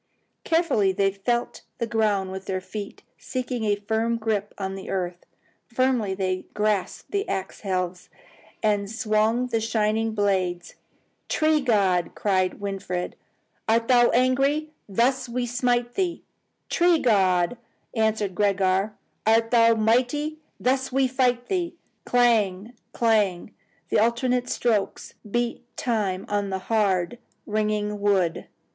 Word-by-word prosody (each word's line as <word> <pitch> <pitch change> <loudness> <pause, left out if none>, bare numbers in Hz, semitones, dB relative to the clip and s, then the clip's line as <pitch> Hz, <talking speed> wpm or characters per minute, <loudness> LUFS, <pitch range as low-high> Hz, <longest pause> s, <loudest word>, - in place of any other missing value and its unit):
Carefully 325 - +2
they 195 +1 +1
felt 235 +5 -2 0.2
the 235 - -1
ground 210 -4 0
with 190 0 -6
their 190 -1 -2
feet, 200 +2 -8 0.2
seeking 250 -3 -3
a 205 -1 +2
firm 220 +3 -1
grip 215 -2 -1
of 190 -1 -3
the 190 - -8
earth. 180 -2 -3 0.4
Firmly 245 -5 +1
they 185 -1 -2
grasped 210 -2 -1
the 400 +1 -1
axe 190 - -3
helves 185 -2 -3 0.5
and 205 -2 +1
swung 220 +1 +1
the 230 -3 -1
shining 220 0 0
blades. 185 -4 0 0.6
"Tree 310 -1 +2
god!" 195 -8 +1
cried 185 -3 0
Winfried, 195 -3 -4 0.5
"art 230 +1 +3
thou 240 -1 +6
angry? 275 +5 +2 0.2
Thus 240 +5 +1
we 245 +1 -1
smite 245 0 0
thee!" 365 -3 -1 0.4
"Tree 345 -1 +3
god!" 190 - +2 0.4
answered 220 -3 0
Gregor, 195 +1 +1 0.3
"art 225 +1 +3
thou 230 -1 +5
mighty? 250 +8 +1 0.2
Thus 260 +1 0
we 265 0 +3
fight 250 -1 +1
thee!" 350 0 -2 0.3
Clang! 225 -3 +2 0.2
clang! 210 -5 +1 0.4
the - - +3
alternate 245 +2 +1
strokes 220 -5 -1 0.2
beat 240 +2 -1
time 205 -6 -1
upon 205 -1 -2
the 190 - -1
hard, 200 0 0 0.3
ringing 210 -1 -1
wood. 190 -5 +1
220 Hz, 125 wpm, -25 LUFS, 195-245 Hz, 0.6 s, thou